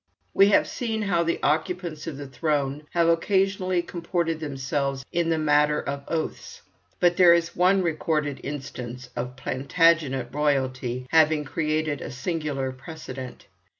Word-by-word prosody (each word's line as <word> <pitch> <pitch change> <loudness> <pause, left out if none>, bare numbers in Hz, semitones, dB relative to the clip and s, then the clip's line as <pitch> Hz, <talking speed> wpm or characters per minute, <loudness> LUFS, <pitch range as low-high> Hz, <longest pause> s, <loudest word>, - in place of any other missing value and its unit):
We 195 - +6
have 205 - +4
seen 225 -3 -3
how 180 -4 +1
the 170 0 0
occupants 160 +1 -1
of 155 -4 -5
the 145 - -6
throne 140 +2 -2
have 165 -1 +2
usually 190 -2 +2
comported 170 -2 -2
themselves 140 -2 -2
in 170 -1 0
the 165 - +2
matter 150 -1 +3
of 140 0 -4
oaths, 465 - -4 0.4
but 175 -1 +3
there 175 -2 +8
is 170 0 -1
one 185 +2 +4
recorded 155 -3 -1
instance 130 -3 -6
of 125 +1 -4
Plantagenet 140 -1 +1
royalty 130 -4 -1
having 155 -1 +4
created 155 0 -1
a - - -5
singular 140 -1 -3
precedent. 130 -2 -9
155 Hz, 140 wpm, -25 LUFS, 135-170 Hz, 0.4 s, there